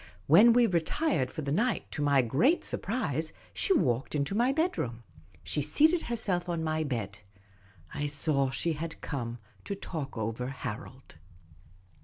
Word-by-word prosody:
When 205 +11 +7
we 245 0 +5
retired 175 - 0
for 155 - -6
the 140 - -2
night, 215 - 0
to - - -3
my 140 -2 +4
great 190 - +2
surprise, 165 - -2 0.2
she - - 0
walked 130 - +1
into 140 +5 -1
my 240 +5 +3
bedroom. 270 - -1 0.4
She 150 - -1
seated 310 - +3
herself 190 -7 -2
on 170 -2 -1
my 155 0 0
bed: 110 -8 -4 0.7
I 145 - -2
saw 140 -2 +2
she 165 +5 -1
had 165 +2 -6
come 120 -5 -4 0.3
to 200 - -4
talk 155 -9 -6
over 115 +3 -3
Harold. 130 - -7
155 Hz, 150 wpm, -29 LUFS, 135-210 Hz, 0.7 s, When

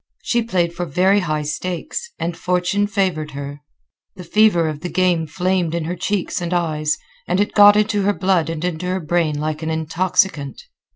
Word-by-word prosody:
She 240 - +1
played 180 -7 0
for 175 0 -4
very 185 +7 +3
high 155 -5 -1
stakes, 180 - -4
and 170 0 -3
fortune 180 +4 0
favored 185 -7 -1
her. 140 +1 -6 0.5
The 185 - -9
fever 175 -2 +3
of 155 -2 -4
the 180 - -5
game 175 -3 +1
flamed 180 0 0
in 170 - -1
her 170 +3 -3
cheeks 185 0 -2
and 175 +1 -2
eyes, 155 -3 0 0.3
and 180 +2 +1
it 205 - 0
got 205 0 +8
into 210 0 +2
her 205 +1 +2
blood 185 -4 +1
and 165 +1 -3
into 180 0 -3
her 185 +1 -1
brain 160 -2 0
like 155 +1 -3
an 160 - -3
intoxicant. 160 - 0
175 Hz, 185 wpm, -20 LUFS, 160-190 Hz, 0.5 s, got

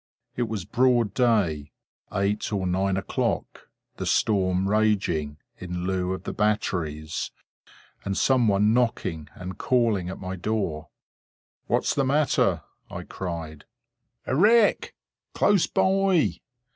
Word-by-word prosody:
It 120 -1 -1
was 105 -6 -4
broad 120 -3 +2
day—eight 100 - -1
or 100 -3 -1
nine 95 +1 0
o'clock; 95 - -3 0.3
the - - -4
storm 95 -2 +1
raging, 100 -9 +1 0.2
in 90 -1 -5
lieu 95 -1 -1
of 95 - -6
the - - -5
batteries; 85 -7 -1 0.7
and 100 0 -2
some 130 -3 +3
one 105 +1 +3
knocking 100 -10 -1
and 90 0 -8
calling 115 -8 +1
at 95 - -6
my 95 0 -5
door. 90 -6 -3 0.8
"What - - +1
is - - 0
the 140 - +1
matter?" 130 - +2 0.3
I - - -6
cried. 80 -4 -6 0.6
"A 130 - -1
wreck! 215 - +4 0.4
Close 205 -4 +3
by!" 190 -3 +2
100 Hz, 120 wpm, -25 LUFS, 90-120 Hz, 0.8 s, wreck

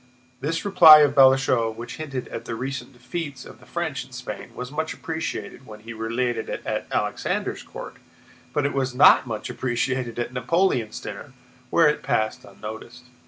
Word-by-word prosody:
This 165 +7 -2
reply 165 -6 +9
of 145 -1 +4
Balashëv's, 130 -4 +4
which 120 0 -7
hinted 135 -5 -5
at 115 - -7
the 115 - -4
recent 130 +1 -5
defeats 145 +3 -6
of - - -13
the - - -18
French - - -3
in - - -18
Spain, - - -8
was 125 +1 -6
much 155 +1 -3
appreciated 160 -4 -5
when 105 -1 -11
he 115 +1 -8
related 115 +1 -2
it - - -5
at - - -3
Alexander's - - -2
court, - - -9 0.5
but 145 - 0
it 140 - 0
was 130 -2 -1
not 130 -1 +7
much 110 -2 -4
appreciated 125 -1 -2
at 120 +1 -3
Napoleon's 125 - 0
dinner, 115 +7 -8 0.4
where 165 +3 +5
it 150 - +1
passed 110 0 -1
unnoticed. 110 +3 -9
130 Hz, 170 wpm, -24 LUFS, 115-145 Hz, 0.5 s, reply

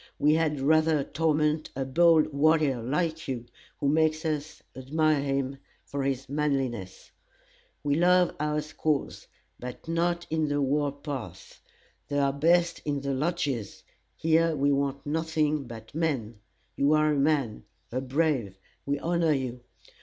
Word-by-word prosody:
We 150 +1 +4
had 155 -3 +1
rather 155 +1 +3
torment 155 +1 0
a 135 0 -2
bold 160 +2 +4
warrior, 150 -3 +3
like 160 +6 -1
you, 125 -3 -3 0.3
who 140 - 0
makes 155 +2 +2
us 155 -1 -3
admire 150 +3 +1
him 135 -1 -2 0.3
for 140 - -4
his 135 0 -2
manliness. 135 -9 -2 0.7
We 145 -1 +1
love 180 +3 +4
our 150 0 0
squaws, 150 -1 -2 0.3
but 125 +5 -8
not 170 +1 0
in 160 -1 +1
the 145 0 0
war 145 +1 +1
path. 135 - -8 0.5
They 145 - -2
are 140 -1 +2
best 170 +4 +2
in 145 -2 -2
the 140 0 -2
lodges; 140 - -2 0.3
here 165 0 +2
we 140 0 +2
want 140 0 -1
nothing 155 -2 0
but 115 -2 -10
men. 135 -9 -2 0.4
You 140 +2 +3
are 155 0 +3
a - - 0
man 140 -6 0 0.3
a 130 +2 -1
brave 130 - 0 0.3
we 140 0 +1
honor 165 0 +1
you. 130 -3 -3
145 Hz, 145 wpm, -27 LUFS, 135-160 Hz, 0.7 s, We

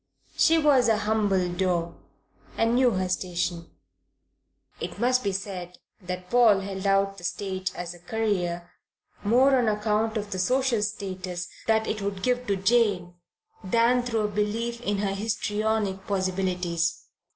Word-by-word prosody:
She 330 0 +4
was 285 -6 +4
a 220 - +4
humble 210 -4 +1
daw 175 -2 -1 0.6
and 230 +1 +2
knew 250 0 +4
her 185 -1 0
station. 175 -2 -2 1.1
It - - -5
must 255 +1 +2
be 200 - 0
said 185 -2 -5 0.2
that 180 0 -6
Paul 230 -5 +5
held 195 0 -4
out 195 0 +2
the - - -14
stage 190 0 -3
as 175 0 -5
a 175 - -14
career 175 -4 -2 0.5
more 255 +6 +4
on 245 -3 +2
account 215 +1 0
of 205 -1 -4
the 185 - -3
social 255 +3 +2
status 185 -4 -4 0.2
that 220 0 +3
it 215 -1 -3
would 195 -1 -4
give 250 0 0
to 200 - +2
Jane 195 -3 +2 0.5
than 235 +5 +3
through 235 -2 -1
a 210 - +1
belief 220 +3 -2
in 205 -3 -1
her 195 -1 -1
histrionic 210 -1 -1
possibilities. 180 -3 -1
200 Hz, 150 wpm, -26 LUFS, 185-225 Hz, 1.1 s, Paul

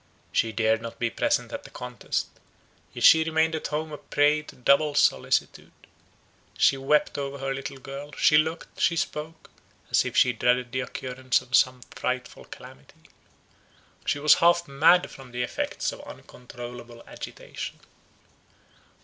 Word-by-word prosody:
She 115 - +1
dared 110 0 +1
not 115 0 -8
be 120 -1 -1
present 290 - 0
at 285 - -4
the - - -12
contest; 125 -1 -4 0.6
yet - - -6
she 160 -1 +8
remained 160 0 +1
at 160 - -3
home 155 +1 -3
a 150 - -7
prey 145 +1 +2
to 150 - -13
double 140 +3 +3
solicitude. 65 - +1 0.9
She - - +4
wept 145 +2 +1
over 140 0 -4
her 135 0 -3
little 135 0 -6
girl; 140 +2 -9
she 150 - +4
looked, 160 +2 -3
she 170 - +3
spoke, 160 0 -5 0.4
as - - +4
if - - -4
she 125 - +5
dreaded 125 +1 +1
the 130 - -2
occurrence 130 0 -1
of 125 0 -2
some 130 -1 +3
frightful 125 0 -4
calamity. 65 - -15 0.9
She - - 0
was 150 +1 +6
half 170 0 +4
mad 160 +6 +4
from 135 -2 -13
the 125 0 -1
effects 120 - -3
of - - -10
uncontrollable 120 -1 -11
agitation. - - -8
135 Hz, 150 wpm, -26 LUFS, 125-155 Hz, 0.9 s, she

